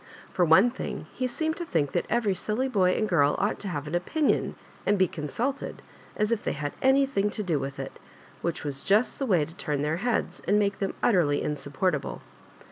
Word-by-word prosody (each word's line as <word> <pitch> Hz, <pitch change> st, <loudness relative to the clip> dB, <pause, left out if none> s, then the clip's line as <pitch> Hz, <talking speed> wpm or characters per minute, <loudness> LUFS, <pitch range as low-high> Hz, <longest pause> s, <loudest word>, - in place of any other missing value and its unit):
Fbr 175 Hz, -2 st, +3 dB
one 190 Hz, +10 st, +6 dB
thing, 260 Hz, -, -5 dB
he 255 Hz, -, -1 dB
seemed 315 Hz, +6 st, -2 dB
to 345 Hz, -, -3 dB
think 160 Hz, -, 0 dB
that -, -, -1 dB
every 220 Hz, -4 st, +2 dB
silly 215 Hz, +8 st, -1 dB
boy 190 Hz, -7 st, +3 dB
and 215 Hz, -, +1 dB
girl 145 Hz, -7 st, +3 dB
ought 205 Hz, +2 st, 0 dB
to 205 Hz, -, -6 dB
have 150 Hz, -6 st, -3 dB
an 150 Hz, -, -6 dB
opinion 280 Hz, -, +1 dB, 0.3 s
and 205 Hz, -, +2 dB
be 185 Hz, -1 st, +4 dB
consulted, 230 Hz, -, -3 dB, 0.3 s
as 210 Hz, +1 st, 0 dB
if 230 Hz, -2 st, +1 dB
they -, -, -1 dB
had 145 Hz, -1 st, -4 dB
anything 265 Hz, -6 st, +3 dB
to 210 Hz, -, -4 dB
do 165 Hz, -6 st, 0 dB
with 135 Hz, 0 st, -5 dB
it -, -, -7 dB, 0.2 s
— -, -, -24 dB
which 170 Hz, 0 st, -2 dB
was 140 Hz, -2 st, -4 dB
just 210 Hz, +5 st, +2 dB
the 270 Hz, -, -1 dB
way 175 Hz, -8 st, +3 dB
to 160 Hz, -, -12 dB
turn 145 Hz, -4 st, -2 dB
their 155 Hz, +2 st, 0 dB
heads,' 240 Hz, +4 st, -1 dB
and 205 Hz, -, +4 dB
make 200 Hz, -1 st, +1 dB
them 195 Hz, -, -2 dB
utterly 165 Hz, -10 st, +3 dB
insupportable. 150 Hz, +2 st, -2 dB
190 Hz, 210 wpm, -27 LUFS, 150-230 Hz, 0.3 s, one